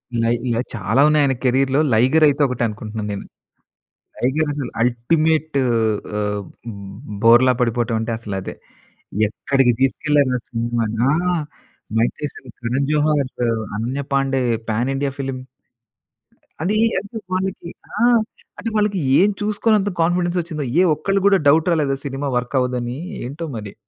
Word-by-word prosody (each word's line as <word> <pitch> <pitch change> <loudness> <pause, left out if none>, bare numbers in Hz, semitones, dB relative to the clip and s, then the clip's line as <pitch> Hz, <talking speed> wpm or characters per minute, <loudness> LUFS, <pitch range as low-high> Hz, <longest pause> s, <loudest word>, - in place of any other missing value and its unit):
ఇలా 115 0 +1 0.2
ఇలా 115 0 +1
చాలా 110 +4 +1
ఉన్నాయి 150 -1 +4
ఆయన 135 - +2
కేరియర్‌లో 135 +2 +2
'లైగర్' 130 +8 +4
అయితే 145 0 +1
ఒకటే 125 -2 -2
అనుకుంటున్నాను 110 0 -5
నేను. 100 - -6 0.9
'లైగర్' 145 +5 0
అసలు 140 -4 -4
అల్టిమేట్ 155 +6 +1 0.6
ఆహ్, 105 -1 -2 0.8
బోర్లా 120 +3 +6
పడిపోవడం 115 -1 0
అంటే 115 +1 -3
అసలు 105 -3 -6
అదే. - - -6 0.7
ఎక్కడికి 130 +3 +1
తీసుకెళ్ళారు 140 0 +2
ఆ - - -5
సినిమా‌ని. 115 -2 -2
ఆ! - - +3 0.8
Mike 115 +2 +2
Tyson, 145 -3 -7
Karan 125 +4 -1
Johar, 150 -3 +2 0.5
Ananya 125 +6 -2
Pandey, 135 -1 +1 0.3
pan 120 +5 0
India 140 0 -1
film. 135 -1 -3 1.2
అది 190 +6 0 0.2
అంటే 205 +3 -9 0.2
వాళ్ళకి 185 -2 -2 0.3
ఆ! - - +5 0.5
అంటే 230 - -3
వాళ్ళకి 210 -2 +1 0.2
ఏమి 205 +3 +4
చూసుకొని 215 +1 +2
అంత 200 +1 -1
కాన్ఫిడెన్స్ 175 +1 +1
వచ్చిందో 160 -3 -5 0.2
ఏ - - +5
ఒక్కళ్ళు 195 +6 0
కూడా 200 -1 +5
డౌట్ 155 +4 +4
రాలేదా 145 -5 +1
సినిమా 140 +1 -3
వర్క్ 125 +3 -3
అవ్వదు 125 0 0
అని 120 +1 -4 0.3
ఏంటో 145 +7 -5
మరి. 105 -2 -7
135 Hz, 140 wpm, -20 LUFS, 120-155 Hz, 1.2 s, బోర్లా